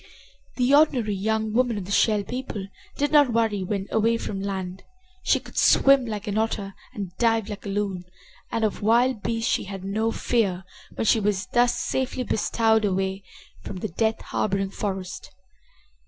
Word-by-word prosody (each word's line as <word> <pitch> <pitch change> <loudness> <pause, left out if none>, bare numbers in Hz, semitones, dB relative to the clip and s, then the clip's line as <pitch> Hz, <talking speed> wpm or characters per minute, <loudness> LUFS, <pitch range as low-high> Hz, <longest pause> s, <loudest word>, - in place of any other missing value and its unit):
The 250 +2 +2
ordinary 265 -8 +4
young 220 +2 -1
woman 245 -2 +2
of 195 - -4
the 195 - -7
Shell 210 0 +3
People 235 -3 -5 0.3
did 290 +1 0
not 290 -4 +5
worry 225 -3 +1
when 195 +1 -2
away 225 +1 +2
from 195 -3 -4
land. 190 -2 -4 0.4
She - - +2
could - - -5
swim 275 -2 +5
like 210 -1 -4
an 210 0 -1
otter 205 -3 -2 0.2
and 190 -4 -6
dive 225 -2 +2
like 205 0 -7
a - - -3
loon, 195 -3 -2 0.5
and 230 -1 -1
of 215 - -1
wild 235 +2 +3
beasts 230 +1 -1
she - - 0
had 195 -1 -7
no 215 +4 0
fear 200 -7 0 0.3
when - - -2
she 225 - +4
was 200 -2 0
thus 240 0 +3
safely 260 -1 -1
bestowed 220 -1 +1
away 190 -1 -1 0.4
from 200 - -7
the 210 +3 -4
death 220 +6 0
harboring 195 -1 -1
forest. 190 -3 -5
215 Hz, 170 wpm, -25 LUFS, 195-230 Hz, 0.5 s, not